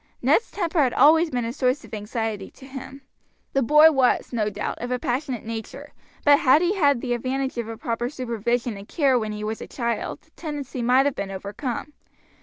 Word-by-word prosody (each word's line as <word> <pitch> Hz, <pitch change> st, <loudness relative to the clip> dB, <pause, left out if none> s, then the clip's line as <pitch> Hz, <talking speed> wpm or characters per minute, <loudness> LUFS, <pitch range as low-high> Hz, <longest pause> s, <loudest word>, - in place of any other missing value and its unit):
Ned's 460 Hz, -, +2 dB
temper 345 Hz, -4 st, -1 dB
had 255 Hz, -3 st, +1 dB
always 320 Hz, +3 st, +6 dB
been 245 Hz, -4 st, -2 dB
a 230 Hz, -, -3 dB
source 255 Hz, +1 st, 0 dB
of -, -, -16 dB
anxiety 215 Hz, -1 st, -3 dB
to 265 Hz, -, -15 dB
him. 270 Hz, 0 st, -9 dB, 0.5 s
The 270 Hz, -, +2 dB
boy 300 Hz, +5 st, +7 dB
was, 265 Hz, -3 st, +2 dB
no 215 Hz, -3 st, 0 dB
doubt, 205 Hz, 0 st, -4 dB
of 245 Hz, -, -4 dB
a 250 Hz, -, 0 dB
passionate 250 Hz, -1 st, -3 dB
nature, 225 Hz, -1 st, -7 dB, 0.3 s
but 290 Hz, -1 st, +7 dB
had 290 Hz, +5 st, +5 dB
he 355 Hz, +2 st, +2 dB
had 285 Hz, -, +2 dB
the 245 Hz, -2 st, -1 dB
advantage 260 Hz, +1 st, -2 dB
of 235 Hz, -, -3 dB
a 225 Hz, 0 st, -6 dB
proper 240 Hz, -2 st, -2 dB
supervision 240 Hz, -3 st, -2 dB
and 200 Hz, +1 st, -11 dB
care 270 Hz, -5 st, +2 dB
when 215 Hz, -1 st, -3 dB
he 210 Hz, 0 st, -5 dB
was 220 Hz, +1 st, -4 dB
a -, -, -7 dB
child 235 Hz, -2 st, -3 dB
the -, -, -31 dB
tendency 290 Hz, -5 st, -5 dB
might 250 Hz, +3 st, +4 dB
have 285 Hz, -, +1 dB
been 200 Hz, -4 st, -4 dB
overcome. 210 Hz, +9 st, -5 dB
250 Hz, 210 wpm, -24 LUFS, 230-280 Hz, 0.5 s, boy